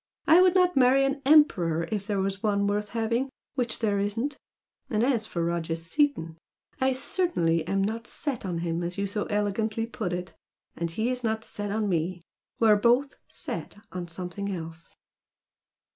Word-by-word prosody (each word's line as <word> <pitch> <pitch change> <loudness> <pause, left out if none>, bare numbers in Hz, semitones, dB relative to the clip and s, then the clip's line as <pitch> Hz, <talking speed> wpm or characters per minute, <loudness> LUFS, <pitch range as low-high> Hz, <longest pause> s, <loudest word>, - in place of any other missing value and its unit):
I 330 +3 +7
would 370 0 +5
not 360 -1 +4
marry 265 +1 +5
an 275 +1 -1
emperor 175 - +4
if 205 -2 -2
there 205 -2 0
were 195 +1 +1
one 200 -2 +1
worth 205 +1 -1
having 230 +4 0 0.2
which 245 -4 0
there 205 -3 +1
isn't! 230 +8 -1 0.5
and 215 0 +1
as 240 -4 +1
for 170 -1 -2
Roger 170 -1 -1
Seaton, 165 - 0 0.4
I 265 0 +3
certainly 255 - +1
am 195 +1 +1
not 225 +3 -3
'set' 280 -5 -3
on 180 -3 -2
him 165 0 -1
as 175 +2 -4
you 200 - 0
so 205 +1 -2
elegantly 210 +2 -1
put 230 -6 -4
it! 180 +1 -4 0.4
And 170 0 -2
he's 245 +8 -1
not 220 -1 -1
'set' 205 -1 -4
on 215 +1 0
me. 175 -1 -1 0.4
We're 220 -2 +6
both 245 +6 +2
'set' - - -6
on 180 -1 -5
something 180 +3 -5
else!" 165 -2 -7
210 Hz, 170 wpm, -27 LUFS, 180-250 Hz, 0.5 s, I